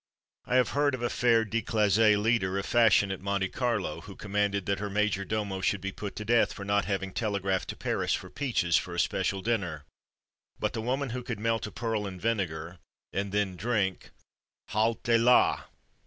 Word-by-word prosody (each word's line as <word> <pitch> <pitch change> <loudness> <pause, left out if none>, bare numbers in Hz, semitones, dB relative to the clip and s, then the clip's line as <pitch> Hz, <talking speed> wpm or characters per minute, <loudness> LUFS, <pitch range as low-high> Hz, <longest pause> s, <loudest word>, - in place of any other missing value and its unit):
I 125 - -1
have 130 -1 +4
heard 145 -1 +1
of 125 - -7
a 120 - 0
fair 115 -2 +3
declassée 110 -1 +3
leader 105 -3 +1
of 100 - -2
fashion 110 -4 +4
at 95 - -5
Monte 100 -1 -1
Carlo, 105 -11 -2
who 95 +3 -11
commanded 100 -1 -1
that 100 -1 0
her 105 0 -3
major 105 -1 0
domo 100 -1 -3
should 100 +1 +1
be 95 +1 -4
put 100 0 -7
to 105 - -6
death 120 +1 +3
for 100 - -8
not 100 0 +1
having 95 -2 -2
telegraphed 100 -4 -1
to - - -4
Paris - - -1
for - - -8
peaches, 115 - 0
for 90 - -3
a - - -2
special 95 +1 0
dinner; 90 -10 -1 0.8
but - - -1
the 110 - -3
woman 130 +3 -1
who 125 +1 -3
could 120 -4 -5
melt 115 +1 0
a - - -9
pearl 110 -3 -2
in 95 -2 -7
vinegar, 90 -6 -2 0.3
and 100 0 -2
then 100 -2 0
drink 100 -2 -1 0.6
_halte 115 +2 +2
la! 125 +1 +4
105 Hz, 190 wpm, -29 LUFS, 95-115 Hz, 0.8 s, have